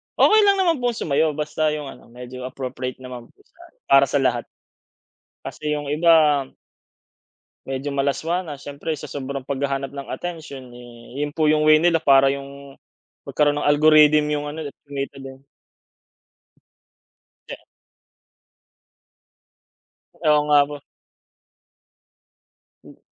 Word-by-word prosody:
Okey 435 0 +5
lang 400 - +5
naman 345 -6 +1
pong 245 -2 -1
sumayaw 155 -2 0
basta 155 +1 -1
yung 145 -2 -6
ano, - - -16
medyo 125 +1 -9
appropriate 130 -1 -6
naman 125 -2 -9
po - - -30
sa - - -34 0.3
para 135 0 +6
sa 145 - 0
lahat. 120 -2 0 0.9
Kasi 150 - -6
yung 145 -1 -3
iba 155 -2 +4 1.2
medyo 135 +2 -4
malaswa 140 +6 -1
na. 150 - -6
Siyempre 145 +3 -5
sa 145 - -9
sobrang 140 -1 -5
paghahanap 135 0 -3
ng 140 -1 -8
atensyon 140 -5 -7
eh, 120 +1 -13
yun 145 - -6
po, 155 -1 +2
yung 155 0 +2
way 155 0 +6
nila 170 -1 +3
para 135 -2 +4
yung 140 0 -8 0.5
magkaroon 145 -1 +1
ng - - -2
algorithm 150 0 +5
yung 150 0 -2
ano 155 +2 -6
nila, - - -11
kumita 140 0 -5
din. 135 0 -11 2.1
De - - -6 2.6
Oo 150 -2 +2
nga 145 -1 +5
po. 145 0 -7 2.1
Hmm. - - -16
145 Hz, 125 wpm, -22 LUFS, 135-155 Hz, 2.6 s, para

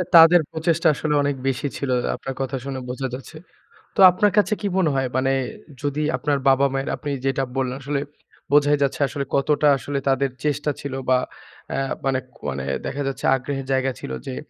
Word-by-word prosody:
তাদের 165 +1 +9
প্রচেষ্টা 165 +1 +1
আসলে 150 -1 -1
অনেক 140 -1 0
বেশি 135 +2 0
ছিল, 140 - -3 0.3
আপনার 135 -1 -6
কথা 135 0 -2
শুনে 135 -1 -4
বোঝা 130 +1 -3
যাচ্ছে। 135 +5 -8 0.6
তো - - -6
আপনার 205 +2 +2
কাছে 210 +1 +4
কি 205 - -1
মনে 175 -5 +3
হয়? 135 -1 +1
মানে 135 +1 +2 0.5
যদি 145 +1 -1
আপনার 145 -1 0
বাবা-মায়ের 135 0 +2
আপনি 145 - -6 0.2
যেটা 135 0 +1
বললেন 130 -1 -1
আসলে, 140 +1 -2 0.5
বোঝাই 145 0 +5
যাচ্ছে 135 - -1
আসলে 140 0 -4
কতটা 145 +2 +2
আসলে 140 +1 -3
তাদের 135 0 +2 0.2
চেষ্টা 145 0 0
ছিল 140 -2 -5 0.2
বা 130 - +5 0.5
অ্যা 135 - 0 0.2
মানে 135 -1 +1 0.2
কো - - -22
মানে 65 0 -4 0.2
দেখা 145 - -3
যাচ্ছে 135 - -4
আগ্রহের 135 +1 -4
জায়গা 130 0 +1
ছিল - - -7 0.2
যে, 65 - -4
140 Hz, 180 wpm, -22 LUFS, 135-150 Hz, 0.6 s, তাদের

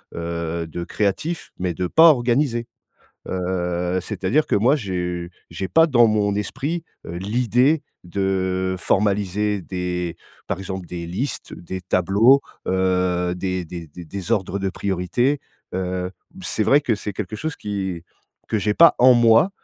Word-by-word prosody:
heu, 85 0 -3
de 85 +2 -5
créatif, 110 - -2
mais 90 -1 -1
de 90 +2 -2
pas 160 - +7
organisé. 120 -2 +1 0.6
Heu 90 -1 -1
c'est-à-dire, 100 - 0
que - - 0
moi 120 +8 +4
j'ai 90 - -3 0.2
j'ai 85 +3 -4
pas 165 - +5
dans 120 -6 +5
mon 105 -2 +1
esprit, 145 +11 -3 0.2
heu, 85 - -6
l'idée 125 - +2 0.2
de 95 0 -1
formaliser 100 +1 +1
des, 90 -1 -3 0.3
par - - -2
exemple, 95 -1 -5
des 85 0 -6
listes, 95 +12 -4
des 95 +2 -6
tableaux, 100 +9 +4 0.3
heu, 90 -1 +1
des 90 0 -2
des 85 0 -8
des 85 +4 -10
des 95 +5 -7
ordres 100 -3 0
de 95 0 -1
priorité. 100 +9 0 0.3
Heu, 90 0 -2 0.2
b - - -13
c'est 90 +5 -1
vrai 140 +7 +5
qui 125 -6 0
c'est 105 0 -5
quelque 100 +1 -5
chose 155 +7 -4
qui 95 -5 -4 0.4
que 110 - -1
j'ai 105 +1 +1
pas 170 +6 +7
en 130 +1 +8
moi, 120 - +5
95 Hz, 155 wpm, -22 LUFS, 90-115 Hz, 0.6 s, en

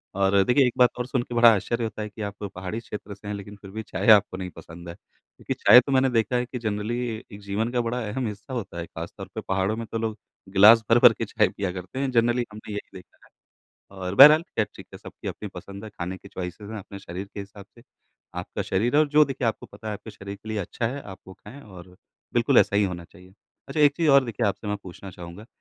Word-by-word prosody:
और 100 0 +3
देखिए 125 +5 +4
एक 120 - -2
बात 125 -1 +6
और 120 - -1
सुन 125 -2 -1
के 120 - -8
बड़ा 115 -1 +7
आश्चर्य 115 +4 -2
होता 110 -1 -4
है 105 - -4
कि 110 +1 -11
आप 100 0 -6
पहाड़ी 95 +4 -5
क्षेत्र 105 -2 -8
से 100 - -13
हैं 105 - -3
लेक़िन 100 +1 -9
फ़िर 95 -1 -13
भी 110 +1 -5
चाय 100 +1 -4
आपको 100 -3 +5
नहीं 90 -1 -5
पसंद 85 +1 -11
है। 85 - -8
क्योंकि - - -9
चाय 125 - +8
तो 140 - -5
मैंने 130 0 +3
देखा 115 0 +1
है 125 0 +1
कि 125 0 -6
जनरली 110 +2 -2 0.3
एक 100 +1 -10
जीवन 105 +4 -2
का 120 -1 +1
बड़ा 120 +2 -2
अहम 125 +2 -2
हिस्सा 105 +5 -8
होता 105 -7 -5
है। 85 - -4
ख़ास - - -8
तौर - - -7
पर - - -3
पहाड़ों 95 +2 0
में 115 - -4
तो 115 - -4
लोग 110 -1 -3 0.3
ग्लास 110 +4 +7
भर-भर 120 +1 +7
के - - -4
चाय - - +2
पिया 95 -3 -3
करते 90 +7 -7
हैं। 135 -1 -1
जनरली 120 0 +2
हमने 105 0 -9
ये 105 - -2
यही 95 - -14
देखा 90 - -17
है। - - -23 0.7
और 90 +1 -4
बरहल 150 +6 +9
ख़ैर 110 - -2
ठीक - - -12
है - - -9
सबकी - - -9
अपनी - - -6
पसंद 100 +2 -9
है, 110 - -8
ख़ाने 90 -1 -5
की - - -14
चॉइसेस 95 +4 -7
हैं 110 - -5
अपने 100 0 -10
शरीर 95 +1 -7
के 100 - -5
हिसाब 100 0 -11
से। 115 - -16 0.6
आपका - - -5
शरीर 115 +9 0
और 155 -1 +4
जो 150 +1 +5
देखिए 135 -3 -3
आपको 110 - -4
पता 105 +2 -10
है 105 - -2
आपके 110 - -10
शरीर 100 0 -9
के 110 - -14
लिए 110 -1 -2
अच्छा 115 +4 -3
है, 135 +4 -4
आप 95 -2 -10
वो 95 - -11
ख़ाएँ 125 +8 -13
और 90 -2 -13 0.4
बिल्कुल - - +4
ऐसा 100 - +3
ही 105 - +4
होना 90 -2 -4
चाहिए। 90 +1 -18 0.4
अच्छा 155 - -2
एक 145 -1 +6
चीज़ 165 -3 +1
और 140 -1 +6
देखिए 115 -1 -2
आपसे 100 +2 -3
मैं 105 - -1
पूछना 95 +1 -10
चाहूँगा। 90 +5 -11
105 Hz, 260 wpm, -25 LUFS, 95-120 Hz, 0.7 s, बरहल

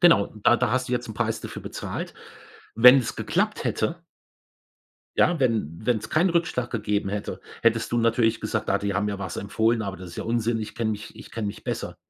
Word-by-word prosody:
Genau, 170 - +6 0.2
da 120 - +6
da 125 -2 +1
hast 130 0 0
du - - -3
jetzt 120 -1 -1
'n 110 - -6
Preis 115 -1 -1
dafür - - -7
bezahlt. - - -5 0.6
Wenn 125 +4 +9
es 120 - -3
geklappt - - 0
hätte 165 +10 -1 1.1
Ja, 175 -3 +3
wenn 110 - 0
wenn's 110 -3 0
keinen 175 +4 +3
Rückschlag 165 -8 0
gegeben 105 -3 -1
hätte, 100 +1 -4 0.2
hättest 115 -1 +2
du 120 - +2
natürlich 115 -1 +2
gesagt: 110 -1 -2
„Ah, 100 - +3
die 100 -1 -2
haben 105 +1 0
ja 100 -1 -3
was 95 -3 -5
empfohlen, 110 +3 +1
aber 100 -1 -4
das 90 -2 -9
ist - - -11
ja - - -3
Unsinn. 115 0 0
Ich 110 - -6
kenne 115 -2 -1
mich 105 0 -8
ich - - -12
kenn 115 -2 -3
mich 100 - -6
besser.“ - - -4
115 Hz, 215 wpm, -25 LUFS, 105-120 Hz, 1.1 s, Wenn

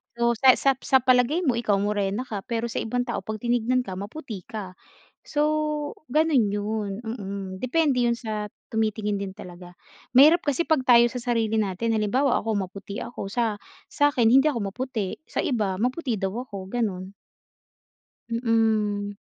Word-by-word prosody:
So 235 0 +2
sa 260 -2 +8
sa 275 - +3
sa 265 -2 +3
palagay 255 +7 +3
mo 250 -6 +1
ikaw 215 -4 +1
morena 205 +2 -1
ka 205 -6 -6
pero 235 0 -2
sa - - -5
ibang 245 +2 -1
tao 240 - -3
pag 215 -1 -5
tiningnan 245 +1 +1
ka 190 -5 -6
maputi 215 - -7
ka. 210 -5 -6 0.5
So 295 - -1 0.7
ganun 265 -7 +2
yun, 205 0 -2
mm. 200 -4 -5
Depende 255 -2 +1
yun 235 - +2
sa 215 -3 -4 0.3
tumitingin 215 -2 0
din 195 -1 -5
talaga, 175 -2 -11 0.4
mahirap 305 +7 +7
kasi 290 +4 +1
pag 280 -5 +2
tayo 240 -1 +7
sa 250 - -6 0.2
sarili 225 -1 0
natin 215 +2 0
halimbawa 245 +5 +2
ako 225 0 -2 0.2
maputi 200 +1 -7
ako 240 - -6
sa 220 0 -1 0.3
sa'kin 285 -6 +3
hindi 270 +5 +6
ako 230 -9 -1
maputi, 235 -4 -3
sa - - -2
iba 210 -7 0
maputi 255 0 -1
daw 190 -1 0
ako, 195 -4 -8
ganun. 195 -5 -3 1.2
Mm. 220 -3 0
225 Hz, 160 wpm, -25 LUFS, 205-250 Hz, 1.2 s, sa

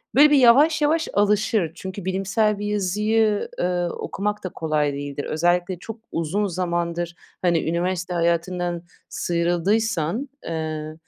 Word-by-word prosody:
böyle, 295 +3 +8
bir 295 - +6
yavaş 280 +5 +6
yavaş 315 +2 +2
alışır. 205 -3 +2
Çünkü 190 +1 -7
bilimsel 195 +3 0
bir 205 - -3
yazıyı, 210 +2 +1
eee, 180 0 0
okumak 205 +4 -3
da 185 - -3
kolay 155 -3 -1
değildir. 145 0 -5
Özellikle 175 +2 0
çok 225 +4 -8
uzun 180 +6 -1
zamandır, 170 -1 -2 0.3
hani, 170 -3 +1
üniversite 175 +1 -1
hayatından 175 0 0 0.3
sıyrıldıysan, 175 - 0
eee, 155 -1 -4
180 Hz, 125 wpm, -23 LUFS, 170-210 Hz, 0.3 s, böyle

